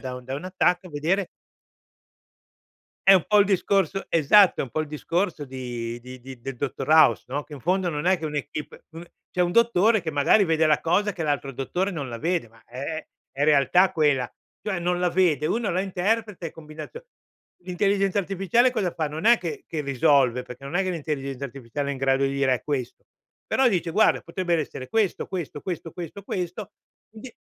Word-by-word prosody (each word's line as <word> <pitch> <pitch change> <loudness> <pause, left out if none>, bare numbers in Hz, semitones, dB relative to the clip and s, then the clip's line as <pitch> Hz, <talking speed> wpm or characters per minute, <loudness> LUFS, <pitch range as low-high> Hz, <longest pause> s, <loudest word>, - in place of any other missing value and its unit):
da 130 -1 -5
un 125 - -11
da 130 +2 -5
una 185 +6 -7
TAC, 180 +1 +2
vedere 170 +6 0 1.8
È 195 - +9
un 180 - +3
po' 210 - +4
il 200 - +4
discorso 195 0 +1
esatto, 170 +5 +5
è - - +1
un 130 - -7
po' 155 - -3
il 155 - -3
discorso 165 +2 -2
di 120 -3 -5
di 130 +1 -11
di 130 0 -11
del 135 +3 -6
dottor 135 +1 -4
House, 155 -7 +5
no? 140 +4 -3
Che 150 - -17
in 145 - -7
fondo 180 +4 0
non 150 -2 -3
è 185 +1 +4
che 165 - -8
un'équipe, 150 0 -6
uhm, 165 +1 -9 0.2
c'è 180 - -3
un 175 -1 +2
dottore 225 0 +3
che 160 -3 -4
magari 145 +8 +4
vede 160 -2 +2
la 155 -1 +3
cosa 200 +5 +1
che 170 -3 -4
l'altro 145 -2 -1
dottore 175 +9 -2
non 150 -8 -5
la 115 -1 -6
vede, 165 -3 -1
ma 115 0 -22
è 140 +6 -6 0.3
è 140 - -2
realtà 155 +5 +4
quella, 145 -6 +1 0.3
cioè 195 -4 -1
non 175 +1 -1
la 180 - +2
vede, 165 -5 +2
uno 225 +4 0
la 180 - +1
interpreta 195 0 -1
e - - -6
combinazio 160 - -10 0.6
l'intelligenza 195 +2 +1
artificiale 195 +6 +2
cosa 210 -8 -1
fa? 155 -2 -1
Non 155 +3 -6
è 235 +2 +7
che 410 - -6
che 160 - -4
risolve, 135 -2 +2
perché 125 +2 -11
non 145 +5 -3
è 195 - +2
che 185 - -1
l'intelligenza 140 -5 -4
artificiale 135 +2 -5
è - - -1
in 135 - -6
grado 135 0 +2
di 135 - +1
dire: 140 -1 +2
“È 120 - -5
questo”. 135 -5 -4 0.4
Però 265 - +3
dice: 180 -6 -1
“Guarda, 215 +7 +3
potrebbero 170 -1 -1
essere 130 -3 -7
questo, 220 -4 0
questo, 170 -6 -5
questo, 170 -1 -5
questo, 175 +4 -8
questo”, 185 +1 -5 0.4
quindi 225 +3 -11
165 Hz, 205 wpm, -25 LUFS, 140-190 Hz, 1.8 s, È